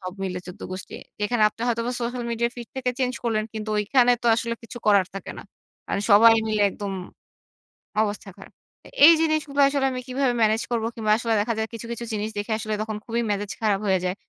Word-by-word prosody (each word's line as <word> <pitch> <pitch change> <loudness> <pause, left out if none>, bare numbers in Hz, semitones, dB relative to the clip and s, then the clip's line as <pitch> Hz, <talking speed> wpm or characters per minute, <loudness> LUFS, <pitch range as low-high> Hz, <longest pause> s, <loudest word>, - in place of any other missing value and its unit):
সব 185 -1 -6
মিলে 185 -1 -3
১৪ 180 - -10
গোষ্ঠী 185 +1 -7 0.3
যেখানে 215 +2 +1
আপনি 220 - -20
হয়তোবা 235 +1 -1
সোশ্যাল 240 +1 -3
মিডিয়া 235 +1 0
ফিড 240 -2 -8
থেকে 255 -1 0
চেঞ্জ 255 -1 0
করলেন, 220 -2 0
কিন্তু 215 0 -4
ঐখানে 245 +4 +4
তো - - -2
আসলে 230 0 -2
কিছু 230 +1 -9
করার 200 -3 +5
থাকে 195 - -6
না - - -8 0.4
কারণ - - -1
সবাই 225 +3 +8 0.2
মিলে 215 -1 +1
একদম 200 0 -5 1.1
অবস্থা 205 -1 -3
খারাপ। 195 - -13 0.3
আ - - -11 0.2
এই 335 - +10
জিনিসগুলা 310 -3 +1
আসলে 275 -1 0
আমি 255 - -4
কিভাবে 260 0 0
ম্যানেজ 220 0 +3
করবো? 230 -2 0
কিংবা 215 -2 0
আসলে 230 -1 0
দেখা 230 +3 0
যায় 220 0 -1
কিছু, 230 0 -7
কিছু 235 0 -5
জিনিস 215 0 -2
দেখে 205 +2 -3
আসলে 215 -1 -3
তখন 215 0 -4
খুবই 235 0 -1
মেজাজ 205 0 -2
খারাপ 205 -3 +2
হয়ে 190 -1 +3
যায়। 180 0 -1
225 Hz, 210 wpm, -24 LUFS, 205-240 Hz, 1.1 s, এই